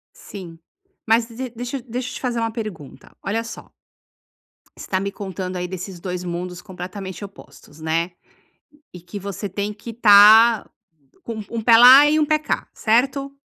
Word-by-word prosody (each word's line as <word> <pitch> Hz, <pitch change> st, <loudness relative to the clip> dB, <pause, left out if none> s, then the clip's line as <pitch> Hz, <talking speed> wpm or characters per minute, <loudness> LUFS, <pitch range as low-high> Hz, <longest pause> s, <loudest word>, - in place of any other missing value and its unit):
Sim. 175 Hz, -5 st, -11 dB, 0.5 s
Mas 225 Hz, +1 st, +3 dB
de 230 Hz, -, -15 dB
de 255 Hz, +1 st, -5 dB
deixa 245 Hz, +3 st, -6 dB
eu 260 Hz, -, -9 dB
deixa 245 Hz, +2 st, -4 dB
eu -, -, -9 dB
te -, -, -8 dB
fazer 245 Hz, -2 st, -2 dB
uma 225 Hz, 0 st, -1 dB
pergunta, 215 Hz, -, -9 dB
olha 225 Hz, +3 st, -2 dB
só 230 Hz, -, -10 dB, 1.1 s
você -, -, -10 dB
está 185 Hz, -, 0 dB
me 200 Hz, -, -3 dB
contando, 190 Hz, -2 st, -6 dB
aí, 180 Hz, 0 st, -4 dB
desses 185 Hz, -1 st, -7 dB
2 180 Hz, -1 st, -5 dB
mundos 180 Hz, +1 st, -5 dB
completamente 190 Hz, +1 st, -8 dB
opostos, 195 Hz, -6 st, -14 dB
né. 165 Hz, +2 st, -1 dB, 0.8 s
E 180 Hz, -, -11 dB
que 180 Hz, +4 st, -8 dB
você 200 Hz, +1 st, -6 dB
tem 200 Hz, +2 st, -4 dB
que 210 Hz, +3 st, -11 dB
estar 220 Hz, 0 st, +6 dB, 0.5 s
com 230 Hz, -, -6 dB
um 215 Hz, -1 st, -7 dB
um 230 Hz, -1 st, -3 dB
pé 225 Hz, 0 st, +6 dB
lá 260 Hz, +5 st, +9 dB
e 305 Hz, -, +2 dB
um 305 Hz, -, +3 dB
pé 305 Hz, +1 st, +1 dB
cá, 310 Hz, -, -3 dB
certo? 275 Hz, +5 st, 0 dB
210 Hz, 180 wpm, -21 LUFS, 185-235 Hz, 1.1 s, lá